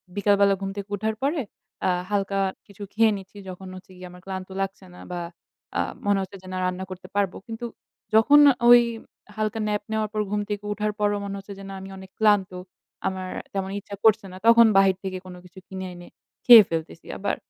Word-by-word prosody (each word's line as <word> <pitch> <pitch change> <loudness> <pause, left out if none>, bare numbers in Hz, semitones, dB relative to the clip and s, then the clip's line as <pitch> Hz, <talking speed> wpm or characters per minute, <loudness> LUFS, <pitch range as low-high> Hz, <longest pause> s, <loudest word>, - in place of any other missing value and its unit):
বিকালবেলা 200 -1 +3
ঘুম 195 - -3
থেকে 200 0 -6
উঠার 220 +2 -2
পরে 290 +3 0 0.4
অ্যা - - +1 0.2
হালকা 200 -1 0 0.3
কিছু 200 0 -11
খেয়ে 225 +1 +4
নিচ্ছি 195 +1 -13
যখন 185 +1 -9
হচ্ছে 185 0 -13
গিয়ে 180 0 -10
আমার 180 0 -14
ক্লান্ত 190 -1 -5
লাগছে 195 0 -4
না - - -13
বা 175 - -3 0.6
আ - - +1 0.3
মনে 205 -1 +3
হচ্ছে 190 +1 -7
যে 185 - -14
না - - -3
রান্না 185 +1 -2
করতে 185 0 -9
পারবো। 200 -2 0
কিন্তু 225 +1 -6 0.5
যখন 285 +7 +7 0.3
ওই 240 0 +9 0.5
হালকা 215 +1 -2
nap 210 0 -1
নেওয়ার 220 -1 -1
পর 215 - 0
ঘুম 210 0 0
থেকে 205 0 -3
উঠার 210 +1 -1
পরও 205 0 +1
মনে 200 0 -5
হচ্ছে 195 +1 -10
যে - - -9
না - - -7
আমি 190 - -9
অনেক 190 0 -12
ক্লান্ত, 205 -3 +3 0.6
আমার 185 -1 -4 0.2
তেমন 190 -1 -2
ইচ্ছা 200 0 -9
করছে 220 -1 +5
না - - -10
তখন 230 0 +8
বাহির 195 -1 +5
থেকে 190 -1 -4
কোন 185 -1 -9
কিছু 180 +1 -14
কিনে 190 0 -6
এনে 175 0 -12 0.4
খেয়ে 235 -3 +11
ফেলতেছি। 165 0 -5
আবার 200 - -1
200 Hz, 200 wpm, -24 LUFS, 190-210 Hz, 0.6 s, খেয়ে